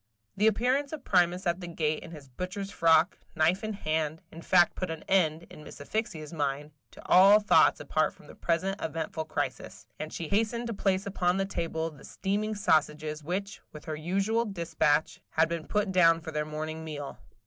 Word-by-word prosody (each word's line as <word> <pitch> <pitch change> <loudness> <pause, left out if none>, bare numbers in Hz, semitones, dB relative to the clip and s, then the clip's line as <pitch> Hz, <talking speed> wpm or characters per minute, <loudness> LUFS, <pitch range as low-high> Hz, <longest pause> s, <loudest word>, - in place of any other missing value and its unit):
The 210 - +3
appearance 255 +6 +1
of 300 -4 -6
Primus 180 0 +2
at 175 +1 0
the 175 - -6
gate 155 -2 -1
in - - -10
his 150 -4 -11
butcher's 185 - -5
frock, 165 -2 +3 0.2
knife 165 +6 +2
in 215 0 -3
hand, 155 -4 -2
in 165 - -10
fact 175 0 +4
put 185 - -4
an 160 -1 -6
end, 165 -4 +2
in 150 - -11
Miss - - -11
Asphyxia's 155 -2 -4
mind, 145 -1 -2 0.2
to - - -15
all 195 +3 +7
thoughts 210 0 +4
apart - - 0
from - - -20
the - - -13
present 185 +4 -1
eventful 160 0 -3
crisis; 155 - -4
and 155 - -5
she 165 - -5
hastened 225 +5 0
to 230 - -3
place 195 -1 0
upon 185 -2 0
the 195 - +1
table 165 -3 -3
the 145 - -16
steaming 210 +3 -2
sausages 155 -4 0
which, 195 +5 -4
with 150 - -11
her 155 - -4
usual 195 +8 0
despatch, 165 -6 0
had 160 0 +2
been 165 -1 -4
put 210 -2 0
down 165 -3 +5
for 160 0 -7
their 150 -1 -2
morning 155 +1 -5
meal. 145 -3 -7
170 Hz, 190 wpm, -29 LUFS, 155-195 Hz, 0.2 s, all